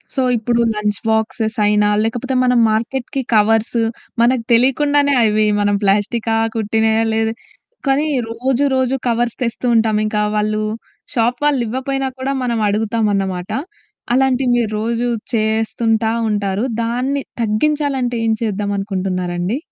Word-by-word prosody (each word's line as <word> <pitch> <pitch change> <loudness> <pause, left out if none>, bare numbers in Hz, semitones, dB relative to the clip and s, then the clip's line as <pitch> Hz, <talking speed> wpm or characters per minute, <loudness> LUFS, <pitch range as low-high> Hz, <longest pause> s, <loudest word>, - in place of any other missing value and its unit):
So, 265 - +1 0.2
ఇప్పుడు 235 +1 0
lunch 210 -1 -2
boxes 220 +1 0
అయినా, 210 0 +3
లేకపోతే 245 +4 -2
మనం 250 -1 +3
మార్కెట్‌కి 245 +4 -2
కవర్సు 225 +2 +2 0.4
మనకు 240 0 +3
తెలియకుండానే 285 +4 +3
అవి 215 0 +2 0.2
మనం 205 0 +2
ప్లాస్టికా, 215 +3 +1 0.2
కుట్టినాయా 220 +1 +1
లేదు 225 0 0 0.5
కానీ 285 +3 +2 0.2
రోజు, 255 +4 0
రోజు 260 0 +1
కవర్స్ 235 0 0
తెస్తూ 235 +1 -2
ఉంటాం. 220 -1 +2
ఇంకా 210 0 0
వాళ్ళు 215 0 0 0.5
షాప్ 240 0 +1
వాళ్ళు 280 -4 +2
ఇవ్వపోయినా 265 +3 -2
కూడా 270 +1 -1
మనం 235 -2 -1
అడుగుతామన్నమాట. 205 -4 -1 0.6
అలాంటివి 260 -1 +2
మీరు 225 -3 0
రోజు 235 +2 -1 0.3
చేస్తుంటా 220 0 +1 0.2
ఉంటారు. 205 0 -1 0.2
దాన్ని 255 +4 -1 0.2
తగ్గించాలంటే 265 +2 0
ఏం 225 - +2
చేద్దంనుకుంటున్నారండి? 195 -1 -2
225 Hz, 120 wpm, -18 LUFS, 210-250 Hz, 0.6 s, అయినా